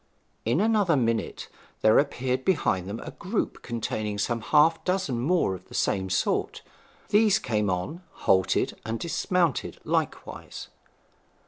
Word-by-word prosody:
In 120 Hz, +7 st, +2 dB
another 210 Hz, -5 st, +3 dB
minute 115 Hz, -2 st, -1 dB, 0.3 s
there 110 Hz, 0 st, +6 dB
appeared 130 Hz, -2 st, -1 dB
behind 95 Hz, -, +1 dB
them 110 Hz, +3 st, -4 dB
a -, -, -7 dB
group 200 Hz, +4 st, -3 dB
containing 110 Hz, -3 st, -3 dB
some 115 Hz, +3 st, -1 dB
half 155 Hz, +6 st, +3 dB
dozen 180 Hz, -10 st, 0 dB
more 155 Hz, -, +2 dB
of 95 Hz, -, -9 dB
the -, -, -11 dB
same 95 Hz, -1 st, 0 dB
sort. 95 Hz, -, 0 dB, 0.5 s
These 210 Hz, 0 st, +5 dB
came 105 Hz, -, -1 dB
on, 95 Hz, -, -3 dB, 0.2 s
halted, 95 Hz, -1 st, +2 dB
and 115 Hz, 0 st, -3 dB
dismounted 170 Hz, -, 0 dB
likewise. -, -, -3 dB
125 Hz, 130 wpm, -26 LUFS, 105-175 Hz, 0.5 s, there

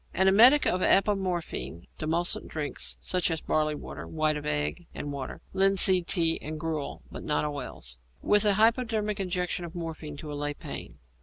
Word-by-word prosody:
_ -, -, -38 dB
An 190 Hz, +2 st, +3 dB
emetic 240 Hz, +10 st, +7 dB
of 185 Hz, -, +1 dB
apomorphine; 185 Hz, -, 0 dB
demulcent 165 Hz, +3 st, +1 dB
drinks, 150 Hz, -2 st, -4 dB
such 180 Hz, -1 st, 0 dB
as 165 Hz, -1 st, -1 dB
barley 155 Hz, 0 st, 0 dB
water, -, -, -8 dB
white 155 Hz, -1 st, 0 dB
of 150 Hz, -, -5 dB
egg 75 Hz, -, -2 dB
and 145 Hz, -, -5 dB
water, 135 Hz, -2 st, -6 dB
linseed 190 Hz, -2 st, +5 dB
tea 165 Hz, -3 st, +2 dB
and 155 Hz, +1 st, -6 dB
gruel 155 Hz, -2 st, -4 dB
(but -, -, -7 dB
not 150 Hz, 0 st, 0 dB
oils), 125 Hz, -, -5 dB, 0.2 s
with 210 Hz, 0 st, +3 dB
a 205 Hz, -2 st, +3 dB
hypodermic 220 Hz, -1 st, +1 dB
injection 180 Hz, -1 st, -2 dB
of 170 Hz, +1 st, -8 dB
morphine 160 Hz, -3 st, -6 dB
to 150 Hz, 0 st, -7 dB
allay 145 Hz, 0 st, -3 dB
pain. -, -, -8 dB
165 Hz, 170 wpm, -28 LUFS, 150-190 Hz, 0.2 s, emetic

